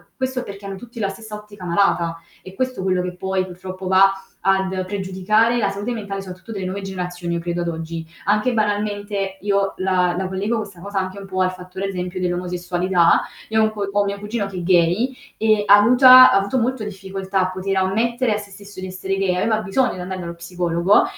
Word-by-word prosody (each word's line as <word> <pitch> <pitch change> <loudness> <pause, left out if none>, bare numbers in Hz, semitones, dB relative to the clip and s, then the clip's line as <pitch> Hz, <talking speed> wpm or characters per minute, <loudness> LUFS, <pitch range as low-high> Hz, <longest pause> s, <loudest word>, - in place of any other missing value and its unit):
questo 260 -1 -2
perché 200 -1 -9
hanno 195 -1 -6
tutti 235 +2 -11
la 200 -2 0
stessa 215 +2 -8
ottica 210 -3 -11
malata. 170 -2 +1 0.2
È 185 - -11
questo 255 -3 -2
quello 185 -1 +1
che 180 0 -4
poi 190 0 -1
purtroppo 185 +1 -8
va 190 +1 +6 0.3
ad 190 -1 +1
pregiudicare 200 +4 +1
la 205 -4 +1
salute 200 +4 -4
mentale 200 -4 -4
soprattutto 190 +4 -9
delle 190 -2 -4
nuove 195 +2 -4
generazioni, 180 -2 -4
io 170 - -1
credo 175 0 -2
ad 170 - -2
oggi. 165 0 -4 0.2
Anche 210 +5 +2
banalmente 205 -2 -1
io 200 -1 +1
la 185 -2 +1
la 190 0 -1
collego 200 +5 -1
questa 200 -5 -6
cosa 200 +1 -3
anche 185 +1 -4
un 200 - -9
po' 185 -1 -2
al 185 0 +2
fattore, 185 +1 -7
ad 195 - -2
esempio, 180 0 -4
dell'omosessualità. 180 0 +1 0.3
Io 220 0 +2
ho - - +5
un 215 - +2
co 200 -2 -3
ho 205 0 +2
mio 200 0 -2
cugino 210 0 -3
che 195 -2 -8
è 175 - -4
gay, 180 +8 +3 0.2
ehm, 215 -1 +3
avuta 250 +5 +9
ha - - +5
avuto 200 +6 0
molto 245 -1 -1
difficoltà 195 -1 -4
a 185 0 0
poter 190 +1 -2
ammettere 225 +5 +1
a - - 0
sé 205 -1 -9
stesso 200 0 -12
di 185 - -5
essere 190 +1 -3
gay, 190 -2 +1
aveva 220 +4 +1
bisogno 230 +6 +1
di 185 - -8
andare 185 +1 -5
dallo 170 0 -6
psicologo 175 - +2
195 Hz, 215 wpm, -21 LUFS, 185-210 Hz, 0.3 s, avuta